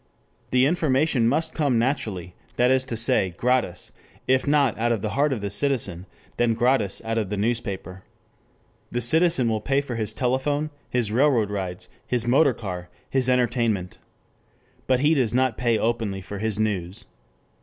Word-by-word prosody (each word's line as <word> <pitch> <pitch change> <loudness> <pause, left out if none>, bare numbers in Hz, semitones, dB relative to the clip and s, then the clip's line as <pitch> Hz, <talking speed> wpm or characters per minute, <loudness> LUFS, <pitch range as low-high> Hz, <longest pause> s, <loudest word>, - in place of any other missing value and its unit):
The 125 +1 +3
information 145 -5 +2
must 160 +6 +1
come 140 -6 +1
naturally, 110 - -2 0.2
that 125 +1 +3
is 130 0 +3
to 120 -3 -4
say 95 -5 +2
gratis, 125 -8 0 0.4
if 130 +1 +2
not 140 -5 +3
out 120 +1 +1
of 115 -3 -1
the 105 - -2
heart 145 +2 +1
of 125 -6 -2
the 100 -1 -3
citizen, 100 -7 -1 0.3
then 120 -1 +2
gratis 120 -4 +1
out 115 0 0
of 105 -4 -3
the 105 - -3
newspaper. 100 -4 -3 0.9
The 120 - -1
citizen 155 +1 +3
will 110 -1 0
pay 135 +5 +1
for 140 -3 -5
his 110 -2 -2
telephone, 145 +5 0 0.2
his 120 -4 0
railroad 120 -4 +2
rides, 95 -3 -4 0.2
his 120 -2 -1
motor 130 +1 +4
car, 90 -5 -6 0.2
his 130 -1 +1
entertainment. 120 -7 0 0.9
But 130 -1 +2
he 150 +3 +4
does 125 -6 +1
not 130 -2 +2
pay 120 -2 +1
openly 110 -4 -1
for 100 +1 -7
his 110 0 -1
news. 100 -1 -2
120 Hz, 165 wpm, -24 LUFS, 105-130 Hz, 0.9 s, motor